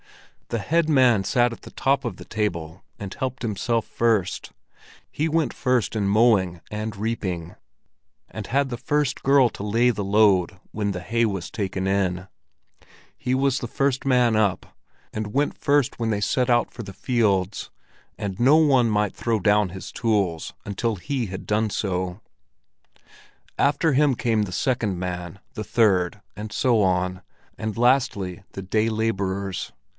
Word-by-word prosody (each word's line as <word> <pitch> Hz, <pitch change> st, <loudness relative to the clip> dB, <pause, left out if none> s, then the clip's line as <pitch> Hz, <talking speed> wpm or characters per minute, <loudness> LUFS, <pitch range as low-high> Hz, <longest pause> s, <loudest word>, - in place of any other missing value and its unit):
The 115 Hz, -, -2 dB
head 165 Hz, +8 st, +1 dB
man 125 Hz, -8 st, +4 dB
sat 120 Hz, +4 st, +2 dB
at -, -, -12 dB
the -, -, -11 dB
top 135 Hz, 0 st, +1 dB
of 115 Hz, -7 st, -4 dB
the -, -, -11 dB
table 85 Hz, -6 st, -3 dB, 0.2 s
and 100 Hz, -2 st, -6 dB
helped 130 Hz, -1 st, -4 dB
himself 115 Hz, +1 st, -1 dB
first, 115 Hz, -6 st, 0 dB, 0.6 s
he 155 Hz, +2 st, -1 dB
went 160 Hz, -1 st, +1 dB
first 125 Hz, -7 st, 0 dB
in 100 Hz, -2 st, 0 dB
mowing 100 Hz, -5 st, +3 dB
and 105 Hz, +1 st, -3 dB
reaping, 95 Hz, -6 st, -3 dB, 0.7 s
and 110 Hz, -2 st, -7 dB
had 140 Hz, +2 st, +1 dB
the 120 Hz, -, -4 dB
first 145 Hz, -1 st, -1 dB
girl 135 Hz, -2 st, +5 dB
to 100 Hz, -, -8 dB
lay 115 Hz, +4 st, +3 dB
the 105 Hz, -3 st, -3 dB
load 95 Hz, -3 st, +3 dB
when 105 Hz, -1 st, -1 dB
the 90 Hz, -, -4 dB
hay 115 Hz, +5 st, 0 dB
was 95 Hz, -5 st, -2 dB
taken 95 Hz, -3 st, -3 dB
in; 95 Hz, -2 st, 0 dB, 0.9 s
he 125 Hz, -, -2 dB
was 135 Hz, 0 st, +1 dB
the 120 Hz, -, -4 dB
first 135 Hz, +2 st, 0 dB
man 125 Hz, -4 st, +3 dB
up, 100 Hz, -4 st, 0 dB, 0.4 s
and 110 Hz, 0 st, -4 dB
went 145 Hz, +1 st, +1 dB
first 145 Hz, -4 st, +1 dB
when 115 Hz, -1 st, 0 dB
they 105 Hz, -2 st, 0 dB
set 125 Hz, +4 st, +1 dB
out 120 Hz, -1 st, +2 dB
for 120 Hz, -, -7 dB
the 100 Hz, -2 st, -9 dB
fields, 100 Hz, -4 st, 0 dB, 0.5 s
and 95 Hz, -2 st, -4 dB
no 135 Hz, +6 st, +6 dB
one 135 Hz, -7 st, +4 dB
might 105 Hz, -2 st, 0 dB
throw 115 Hz, -2 st, 0 dB
down 105 Hz, 0 st, +3 dB
his 95 Hz, +2 st, -8 dB
tools 100 Hz, -8 st, 0 dB
until 105 Hz, +3 st, -1 dB
he 125 Hz, +5 st, -3 dB
had 95 Hz, 0 st, -7 dB
done 105 Hz, +3 st, +1 dB
so. 90 Hz, -2 st, -2 dB, 1.4 s
After 145 Hz, +2 st, +2 dB
him 140 Hz, -1 st, +3 dB
came 115 Hz, -2 st, +1 dB
the 100 Hz, -, -5 dB
second 110 Hz, -2 st, 0 dB
man, 90 Hz, 0 st, -5 dB
the 110 Hz, -, -4 dB
third, 100 Hz, -3 st, +2 dB
and 105 Hz, +1 st, -7 dB
so 115 Hz, 0 st, +2 dB
on, 90 Hz, -1 st, 0 dB, 0.4 s
and 110 Hz, 0 st, -4 dB
lastly 120 Hz, -7 st, +1 dB
the 95 Hz, -, -6 dB
day 110 Hz, +4 st, +1 dB
laborers. 100 Hz, -4 st, -2 dB
110 Hz, 160 wpm, -24 LUFS, 95-125 Hz, 1.4 s, no